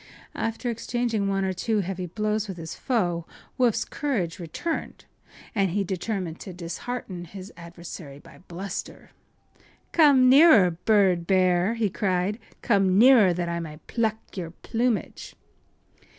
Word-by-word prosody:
After 230 +2 -2
exchanging 230 -2 -1
one 195 0 0
or 190 - -1
two 215 +3 0
heavy 185 -1 -4
blows 215 +3 -1
with 190 -3 -6
his 165 -1 -7
foe 175 -10 -1 0.3
Woof’s 230 -3 +2
courage 205 - -2
returned, 180 - -5 0.5
and 195 -4 +1
he 200 +4 0
determined 185 -2 -4
to 185 - -8
dishearten 180 +2 -6
his 190 +3 -10
adversary 170 -4 -10
by 145 -1 -16
bluster. 190 +3 -7 0.8
“Come 285 -6 +6
nearer, 260 - +7
bird 180 -1 +2
bear!” 185 +2 +3
he 220 -4 0
cried. 190 +3 -1 0.2
“Come 195 -5 +3
nearer, 230 -4 +7
that 175 0 -2
I 170 0 -2
may 155 -2 -7
pluck 220 -2 0 0.2
your 175 -4 -4
plumage! 230 +6 -3
195 Hz, 135 wpm, -25 LUFS, 175-225 Hz, 0.8 s, nearer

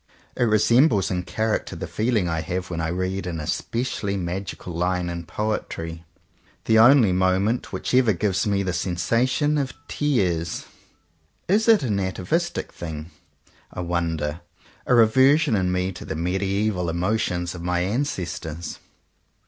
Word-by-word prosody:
It 125 - +2
resembles 110 - +4
in 90 -1 0
character 110 +4 -2
the - - -5
feeling 110 -4 0
I 80 -1 -1
have 90 +3 -4
when 80 -1 -2
I 80 - -1
read 95 +2 -2
an 85 -2 -3
especially 100 +5 -2
magical 90 0 -5
line 90 +1 0
in 85 -1 -6
poetry 85 -6 -4 0.3
— - - -35
the 110 0 +4
only 120 -3 +7
moment 95 +5 +1
which - - -4
ever 125 -3 +5
gives 100 +1 0
me 100 -1 +1
the 90 -2 -2
sensation 120 - +1
of 135 -2 -2
tears. 90 - 0 0.8
Is 210 +5 +2
it 225 -7 +6
an 105 -6 0
atavistic 95 - -2
thing, 80 -1 -7 0.6
I - - -5
wonder; 85 -2 -2 0.5
a 125 - +4
rever 130 +5 +6
sion 155 -8 +1
in 90 -2 +1
me 90 +1 0
to 90 - -9
the - - -5
mediaeval 95 +2 0
emotions 90 0 -1
of 85 - -8
my 90 0 0
ancestors? 90 - -3
95 Hz, 150 wpm, -24 LUFS, 85-110 Hz, 0.8 s, only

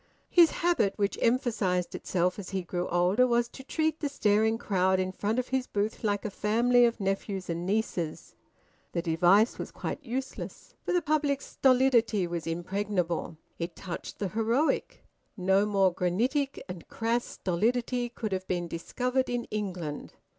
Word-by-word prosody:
His 340 -2 +7
habit, 335 - +1
which 200 -1 0
emphasised 220 -8 +1
itself 180 +1 -1
as 190 - -7
he 190 -2 -2
grew 175 +1 -3
older, 180 +8 +3
was 235 -1 +2
to 265 - -11
treat 315 +2 -1
the 290 - -1
staring 220 -4 +2
crowd 190 -3 +1
in 185 0 -1
front 210 +4 -2
of 255 - -1
his 260 -1 0
booth 210 +3 -2
like 205 -1 0
a 215 - -2
family 240 +5 +3
of 235 0 0
nephews 195 -2 -2
and 170 +2 -3
nieces. 190 -6 -2 0.6
The 170 - -1
device 180 +7 +4
was - - -4
quite 295 - -5
useless, 260 +1 -6
for - - -2
the 355 -1 +2
public's 290 -2 +1
stolidity 250 -6 +3
was 170 -1 -4
impregnable. 175 -1 -2 0.2
It 170 0 -4
touched 180 -3 -7
the 200 - -2
heroic. 230 - 0 0.3
No 190 +2 +3
more 195 -3 +3
granitic 245 - 0
and 180 -3 -8
crass 230 +1 0
stolidity 240 +6 -1
could 225 -3 -5
have 190 0 -3
been 175 -1 -1
discovered 250 +10 -1
in 245 -1 -1
England. 180 -8 -4
210 Hz, 160 wpm, -29 LUFS, 180-245 Hz, 0.6 s, His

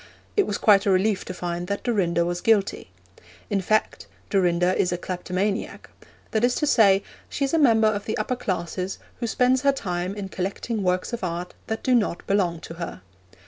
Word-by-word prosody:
It 410 - +3
was 205 - -1
quite 205 -1 +4
a - - +4
relief 195 +2 +2
to - - -5
find 175 0 -4
that 200 +1 -3
Dorinda 175 -8 +1
was 175 0 -2
guilty. 215 -3 +1 0.6
In 200 -1 +1
fact, 215 +4 0 0.2
Dorinda 180 -1 +2
is 180 - +1
a 175 - -1
kleptomaniac; 185 +3 -3 0.4
that 220 +1 0
is 245 0 +3
to 300 - 0
say, 200 -8 +5 0.3
she 275 - -1
is 275 - -3
a 325 - +4
member 225 -6 +5
of 205 -1 -1
the 220 - -2
upper 215 +4 -1
classes 185 -3 -3 0.2
who 235 - -2
spends 250 +2 +2
her 280 - +4
time 180 -7 -3
in 200 -2 -5
collecting 200 +4 -3
works 180 +4 0
of 235 - -4
art 175 0 -3
that 220 0 -3
do 255 - +2
not 210 -7 +1
belong 180 -4 +1
to 165 - -8
her. 165 - -5
195 Hz, 195 wpm, -24 LUFS, 180-225 Hz, 0.6 s, say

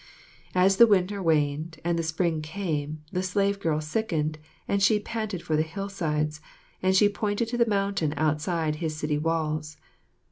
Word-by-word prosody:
As 190 +1 +4
the 235 - +9
winter 200 -1 +2
waned 155 -1 0
and 170 -1 +1
the - - +2
spring 160 0 0
came, 155 -3 -3
the 180 - -1
slave 200 +2 0
girl 160 -4 0
sickened, 155 -2 -1 0.3
said 200 0 0
she 210 +2 +4
panted 215 -4 -4
for 155 - 0
the 155 - +3
hillsides, 160 -4 -2 0.4
and 185 0 +2
she 205 +2 +6
pointed 205 +2 -1
to 240 - -2
the 235 - +4
mountain 195 -7 0
outside 155 +1 0
his 155 -1 -3
city 150 -1 -1
walls. 155 -1 -1
165 Hz, 165 wpm, -27 LUFS, 155-200 Hz, 0.4 s, the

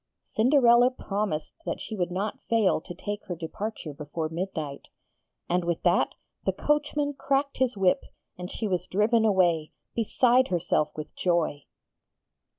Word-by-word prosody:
Cinderella 245 0 +5
promised 200 -10 -3
that - - -3
she 220 - -6
would 180 -3 -1
not 200 +4 -3
fail 220 -8 +3
to 175 - -9
take 205 +3 -5
her 175 - -4
departure 175 0 -5
before 150 +3 -4
midnight: 160 -4 -4 0.6
and, 180 +1 +1
with 170 -1 -2
that, - - +3 0.3
the - - +2
coachman 295 -1 0
cracked 275 +1 0
his 255 -4 +1
whip 190 -2 +2 0.3
and 180 0 -7
she 220 - -3
was 180 -2 -1
driven 220 +3 +3
away, 175 -6 +2 0.2
beside 245 +3 +3
herself 170 -4 +1
with 155 0 -7
joy. 170 -5 0
195 Hz, 145 wpm, -27 LUFS, 170-235 Hz, 0.6 s, Cinderella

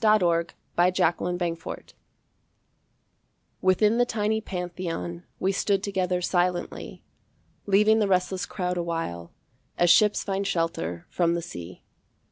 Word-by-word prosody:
In 215 0 +6
the 170 -2 +2 0.3
Metropolitan 175 0 +2 0.2
Museum 165 - -7 1.8
Within 210 +5 +3
the 245 - +5
tiny 220 0 0
Pantheon 175 -2 -5
We 190 - +1
stood 195 0 0
together 185 -3 -1
silently, 180 0 -1 0.6
Leaving 210 +2 +5
the 210 - +2
restless 185 0 0
crowd 180 -2 -2
awhile 165 - -3 0.5
As 175 -1 +5
ships 210 -1 +4
find 195 0 -2
shelter 165 - -2
from 170 -1 +2
the 170 - -2
sea. 85 - -9
180 Hz, 115 wpm, -26 LUFS, 170-200 Hz, 1.8 s, In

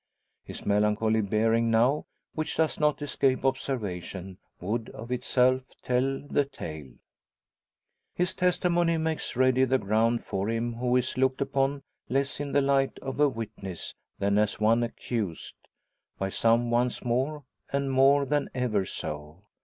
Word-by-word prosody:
His - - -9
melancholy 105 +2 +2
bearing 115 +3 +2
now, 120 +6 +2 0.3
which 155 0 -3
does 160 -1 +1
not 150 -1 +1
escape 135 -2 +1
observation, 95 -8 -3 0.2
would 110 +5 -2
of 115 +2 -9
itself 125 +1 +2 0.2
tell 130 +2 0
the 145 - +2
tale. 80 - -8 1.2
His 180 0 0
testimony 175 -2 +2
makes 160 -3 -2
ready 130 +1 +4
the 130 0 +3
ground 115 +2 +1
for 95 +2 -2
him 115 +1 -1
who 125 +1 0
is 125 0 0
looked 130 0 +2
upon 140 0 0 0.3
less 135 +2 0
in 145 -1 -3
the 140 - +3
light 135 -1 +2
of 135 +1 -5
a 150 -1 +5
witness 105 -7 -6 0.2
than 100 +1 +2
as 105 -1 0
one 115 +2 +4
accused, 115 -6 -3 0.6
by 95 - -2
some 115 +3 +2
once 120 +1 +1
more, 135 +5 0 0.3
and 140 -1 0
more 135 +2 +5
than 145 0 0
ever 110 -6 0
so. 75 +2 -6
125 Hz, 145 wpm, -28 LUFS, 110-135 Hz, 1.2 s, a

